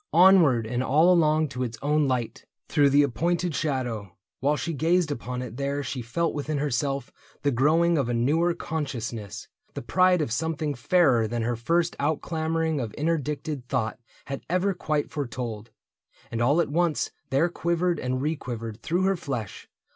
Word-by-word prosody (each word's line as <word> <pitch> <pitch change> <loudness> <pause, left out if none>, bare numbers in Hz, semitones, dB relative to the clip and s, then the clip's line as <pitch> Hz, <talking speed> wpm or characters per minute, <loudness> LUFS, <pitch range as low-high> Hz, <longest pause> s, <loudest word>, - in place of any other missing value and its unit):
Onward 170 - +6
and 120 +2 -2
all 160 +7 +4
along 155 -2 +3
to 130 -1 -5
its 115 -2 -3
own 150 0 +2
light, 125 -3 -2 0.2
Through 145 -1 +4
the 145 +1 +5
appointed 170 +6 0
shadow. 120 - -3 0.2
While 145 +3 +1
she 170 +2 -3
gazed 165 +2 +2
Upon 125 -1 -4
it 120 -1 -8
there 140 +1 -2
she 130 -1 -4
felt 140 +9 -1
within 150 0 -2
herself 140 0 -1 0.3
The 145 - +2
growing 160 +6 +3
of 130 -3 0
a - - 0
newer 160 +8 +2
consciousness 120 -9 -5
— - - -42
The - - -5
pride 185 +6 +3
of 150 -7 -1
something 155 +3 -1
fairer 130 -3 +3
than 115 +1 -2
her 120 +1 0
first 165 +9 0
Outclamoring 160 +1 -1
of 115 -5 -4
interdicted 150 -3 -2
thought 115 -4 -1 0.3
Had 135 -1 -5
ever 185 +3 +1
quite 155 -4 -2
foretold; 120 -6 -4 0.6
and 115 - -2
all 140 +7 +3
at - - -2
once 170 0 +1 0.2
There 135 +6 +3
quivered 170 0 0
and 130 +1 -2
requivered 120 -7 -4
through 175 +3 0
her 195 0 +2
flesh. 135 - -5
145 Hz, 170 wpm, -26 LUFS, 125-165 Hz, 0.6 s, Onward